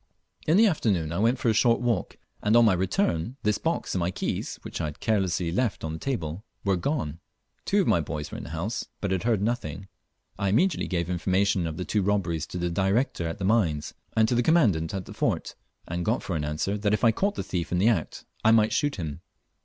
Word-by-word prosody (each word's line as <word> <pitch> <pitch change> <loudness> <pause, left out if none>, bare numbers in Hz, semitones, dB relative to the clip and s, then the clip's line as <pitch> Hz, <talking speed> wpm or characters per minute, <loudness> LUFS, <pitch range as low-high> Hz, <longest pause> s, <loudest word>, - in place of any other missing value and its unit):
In 160 +4 +5
the 225 - +7
afternoon 100 - +1
I 85 - -2
went 115 +4 +3
for 120 - -2
a - - +4
short 115 +2 +4
walk, 120 -7 -1 0.2
and 105 +2 +2
on 120 - +7
my 105 - +5
return 95 - 0
this 105 0 +1
box 165 - -1
and 95 - 0
my 85 0 0
keys, 90 - -3
which - - -5
I - - -1
had 75 -1 -6
carelessly 95 -6 0
left 115 +4 -1
on 80 0 -3
the 80 - -6
table, 90 - -3 0.2
were 100 -1 +2
gone. 90 - -2 0.5
Two - - +3
of - - -1
my - - +4
boys 75 -1 -5
were - - -5
in - - -8
the - - -8
house, 85 +8 -3
but 100 - -2
had 95 -2 +1
heard 110 -4 +2
nothing. 100 -5 -3 0.5
I 100 - +1
immediately 170 - +2
gave 85 -2 -1
information 95 +1 +1
of 80 -1 -5
the 90 - -3
two 105 - +1
robberies 90 -5 0
to - - -6
the 85 0 -1
Director 95 0 +1
at 80 - -4
the 95 - -3
mines 90 -9 +1 0.2
and 110 0 +5
to 125 - +1
the 120 - +3
Commandant 110 - +3
at 95 -2 -4
the - - -9
fort, - - -1 0.3
and 85 +1 -3
got 110 +6 0
for 90 - -3
answer, 75 +7 -1
that 105 +1 +2
if - - -6
I 115 - +6
caught 200 - 0
the - - -3
thief 85 -4 -3
in 90 - +1
the 100 +6 +4
act 95 -9 -2 0.2
I 110 - +5
might 110 -1 +4
shoot 145 -1 +1
him. 75 -5 -5
100 Hz, 240 wpm, -27 LUFS, 85-115 Hz, 0.5 s, the